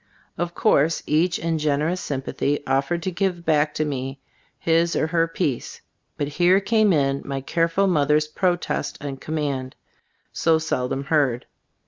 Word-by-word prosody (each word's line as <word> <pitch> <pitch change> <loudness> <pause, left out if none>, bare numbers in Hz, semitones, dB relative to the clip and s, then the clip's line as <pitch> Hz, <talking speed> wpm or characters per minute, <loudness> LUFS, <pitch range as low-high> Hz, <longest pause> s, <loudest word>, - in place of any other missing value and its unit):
Of 175 +1 -3
course, 160 -7 +2
each 160 +4 +2
in 165 -1 -1
generous 155 +4 0
sympathy 140 +1 -2
offered 140 +6 0
to 185 - -1
give 175 -1 -2
back 150 -1 +2
to 155 - 0
me 135 -1 -4 0.4
his 165 +1 +2
or - - +2
her 165 0 +1
piece; 155 -7 -3 0.4
but 145 - -1
here 175 +5 +3
came 215 +1 +3
in 140 -4 +1
my 135 -1 -3
careful 165 +6 +1
mother's 150 -4 +2
protest 175 +2 -1
and 140 -2 -6
command, 140 -4 -3 0.6
so 165 -1 +3
sel 130 -5 -2
dom 135 - -2
heard. 140 -5 +1
155 Hz, 150 wpm, -23 LUFS, 140-170 Hz, 0.6 s, here